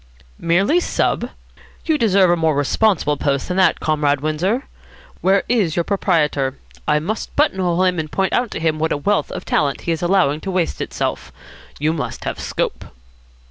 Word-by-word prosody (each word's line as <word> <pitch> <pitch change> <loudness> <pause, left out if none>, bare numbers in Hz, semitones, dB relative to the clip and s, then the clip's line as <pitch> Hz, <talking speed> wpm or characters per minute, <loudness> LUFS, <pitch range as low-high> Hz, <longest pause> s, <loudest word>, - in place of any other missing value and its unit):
"Merely 195 - +2
sub? - - -1 0.6
You 320 - +2
deserve 195 -5 +4
a - - +4
more 160 -3 +1
responsible 150 +1 +1
post 140 -1 -1
than 180 - -2
that, 190 - +3
Comrade 150 -2 +1
Windsor. 170 - -1 0.6
Where 195 +1 +3
is 210 -10 +1
your 170 - +1
proprietor? 150 -9 0 0.3
I 150 - +3
must 200 +9 -4
buttonhole 185 - +2
him 180 -2 +1
and 155 -1 -4
point 190 -1 0
out 245 -1 +1
to - - -5
him 160 -1 0
what 160 +1 0
a - - +1
wealth 205 +8 0
of - - -6
talent 140 -2 0
he 170 - -2
is 160 - -2
allowing 175 -5 +2
to 195 - -5
waste 185 -3 -1
itself. - - -3 0.5
You 155 +2 0
must 160 - -4
have - - -4
scope." - - -3
170 Hz, 180 wpm, -20 LUFS, 150-195 Hz, 0.6 s, deserve